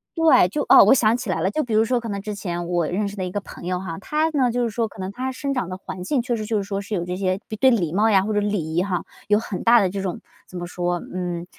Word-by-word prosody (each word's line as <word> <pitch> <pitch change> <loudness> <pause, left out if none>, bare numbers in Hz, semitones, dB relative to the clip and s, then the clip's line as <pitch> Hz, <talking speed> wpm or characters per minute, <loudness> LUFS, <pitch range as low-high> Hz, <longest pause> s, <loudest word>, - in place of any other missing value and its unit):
对， 310 - +5
就 295 +8 -2
哦， - - +9
我 - - +7
想 225 -2 +3
起 245 -4 -5
来 160 - -1
了， 190 +4 +1
就 310 - 0
比 230 -3 -2
如 220 +1 +4
说 245 +1 +1
可 230 -1 -6
能 200 -1 -3
之 210 -1 -4
前 175 -3 -4
我 175 -3 0
认 200 +3 -1
识 200 - -7
的 190 - -4
一 180 - -3
个 205 - -2
朋 195 - -11
友 180 - 0
哈， 185 -1 -6
他 310 +7 0
呢， 270 -5 +2
就 245 +1 0
是 235 - 0
说 225 +1 -1
可 215 - -15
能 190 +1 -4
他 260 +4 -3
生 275 +2 -3
长 245 -9 -2
的 185 - -5
环 185 -1 -8
境 245 +5 0
确 245 -1 -1
实 215 - -4
就 215 0 -1
是 200 - -1
说 195 0 -3
是 205 +1 -4
有 175 -1 -2
这 180 - -3
些 185 0 -1 0.2
对 265 - +6
礼 175 -9 +1
貌 215 +3 +3
呀 195 -2 +4
或 215 +1 -2
者 205 - +2
礼 200 -6 -2
仪 175 - +3
哈， 185 -2 -2 0.2
有 210 0 +4
很 210 -4 -4
大 235 0 +6
的 190 -3 +1
这 195 0 -3
种 185 -3 -3 0.3
怎 185 - -9
么 175 - -4
说， 175 0 -2 0.2
嗯， 175 -1 -3
200 Hz, 340 characters per minute, -22 LUFS, 180-235 Hz, 0.3 s, 哦